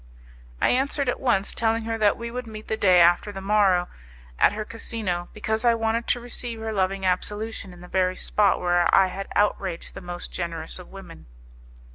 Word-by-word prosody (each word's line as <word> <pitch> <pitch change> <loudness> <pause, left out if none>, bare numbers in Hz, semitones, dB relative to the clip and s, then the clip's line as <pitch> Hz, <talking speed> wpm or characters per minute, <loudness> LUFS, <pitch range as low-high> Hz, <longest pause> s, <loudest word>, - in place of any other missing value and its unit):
I - - +3
answered 275 +1 0
at - - -2
once, 220 -6 +1
telling 225 0 0
her 225 0 -2
that 210 -1 +3
we 235 0 -6
would 250 0 -5
meet 215 -1 -9
the 220 - -1
day 185 -4 +5
after 175 +4 +4
the 195 - -7
morrow 195 -3 +3 0.5
at - - +5
her 215 0 -4
casino, 210 -6 -3
because 220 +1 -2
I 235 -1 +4
wanted 225 +1 -1
to 245 - +2
receive 240 -1 -3
her 220 0 -4
loving 190 -1 0
absolution 205 +2 -2
in 175 -1 -14
the 180 - -11
very 185 0 +1
spot 205 +1 +2
where 175 -1 +2
I 190 -1 +5
had 195 +2 -6
outraged 195 -4 0
the - - -8
most 175 -1 -7
generous 165 -1 -3
of 180 - -11
women. 185 - -12
205 Hz, 195 wpm, -25 LUFS, 180-225 Hz, 0.5 s, day